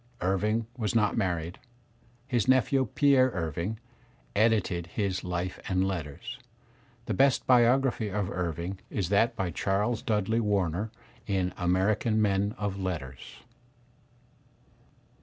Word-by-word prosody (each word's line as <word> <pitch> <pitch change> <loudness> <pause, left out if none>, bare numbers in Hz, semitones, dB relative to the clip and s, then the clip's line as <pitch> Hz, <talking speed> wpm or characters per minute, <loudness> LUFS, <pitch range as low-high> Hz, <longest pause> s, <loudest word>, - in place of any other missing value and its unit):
Irving 105 +5 +1
was 115 -2 -2
not 105 -3 +3
married. 90 -4 -2 0.7
His 125 -4 0
nephew 130 0 +3
Pierre 135 -3 +5
Irving, 85 +5 -3 0.6
edited 100 -6 +2
his 95 0 -2
"Life 90 +1 -3
and 95 0 +2
Letters." 95 - -5 0.7
The 110 - -2
best 135 +6 +3
biography 125 -2 +3
of 100 -1 -2
Irving 90 +2 -3
is 95 -5 -2
that 105 +3 +3
by 90 -3 -2
Charles 105 +7 0
Dudley 110 +1 0
Warner 100 -2 0 0.4
in 95 -3 0
American 100 +5 +1
Men 100 0 +1
of 100 -1 -3
Letters. 80 -9 -6
100 Hz, 115 wpm, -28 LUFS, 90-115 Hz, 0.7 s, Pierre